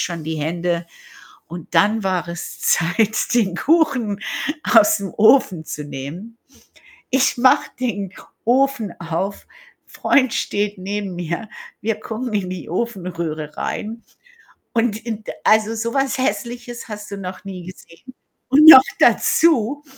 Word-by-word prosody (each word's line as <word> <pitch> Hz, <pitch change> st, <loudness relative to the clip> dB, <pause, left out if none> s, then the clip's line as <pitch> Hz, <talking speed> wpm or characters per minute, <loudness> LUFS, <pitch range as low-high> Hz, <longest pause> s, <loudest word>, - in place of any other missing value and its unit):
schon 170 Hz, -3 st, -3 dB
die 160 Hz, 0 st, -3 dB
Hände. 170 Hz, +2 st, -2 dB, 0.6 s
Und 170 Hz, -1 st, -9 dB
dann 210 Hz, +1 st, +3 dB
war 185 Hz, -2 st, -1 dB
es 170 Hz, 0 st, -7 dB
Zeit, 215 Hz, +7 st, +1 dB
den 200 Hz, -7 st, +1 dB
Kuchen 260 Hz, -, +1 dB, 0.4 s
aus'm 210 Hz, -, +3 dB
Ofen 210 Hz, -7 st, +4 dB
zu 150 Hz, -, -6 dB
nehmen. 155 Hz, +12 st, -8 dB, 0.7 s
Ich 260 Hz, 0 st, +2 dB
mache 255 Hz, +1 st, +4 dB
den 205 Hz, -7 st, -3 dB, 0.3 s
Ofen 250 Hz, -4 st, +1 dB
auf, 170 Hz, +4 st, -4 dB, 0.4 s
Freund 260 Hz, -4 st, +1 dB
steht 205 Hz, -1 st, -2 dB
neben 195 Hz, 0 st, -4 dB
mir, 175 Hz, +5 st, -4 dB, 0.3 s
wir 215 Hz, 0 st, -2 dB
gucken 230 Hz, +2 st, -5 dB
in 185 Hz, -3 st, -1 dB
die 185 Hz, -3 st, -7 dB
Ofenröhre 170 Hz, -7 st, -4 dB
rein. 225 Hz, +2 st, -5 dB, 0.7 s
Und, 230 Hz, -2 st, +1 dB
in 220 Hz, -2 st, -5 dB
d -, -, -5 dB
also, 220 Hz, +1 st, +3 dB
sowas 250 Hz, +5 st, -1 dB
Hässliches 240 Hz, -2 st, -4 dB
hast 210 Hz, -1 st, -8 dB
du 200 Hz, -, -5 dB
noch 185 Hz, +1 st, -8 dB
nie 185 Hz, -3 st, -8 dB
gesehen. 185 Hz, +6 st, -14 dB, 0.3 s
Und 295 Hz, +4 st, +7 dB
noch 265 Hz, -5 st, +12 dB, 0.2 s
dazu 290 Hz, -4 st, +3 dB
210 Hz, 130 wpm, -20 LUFS, 180-240 Hz, 0.7 s, noch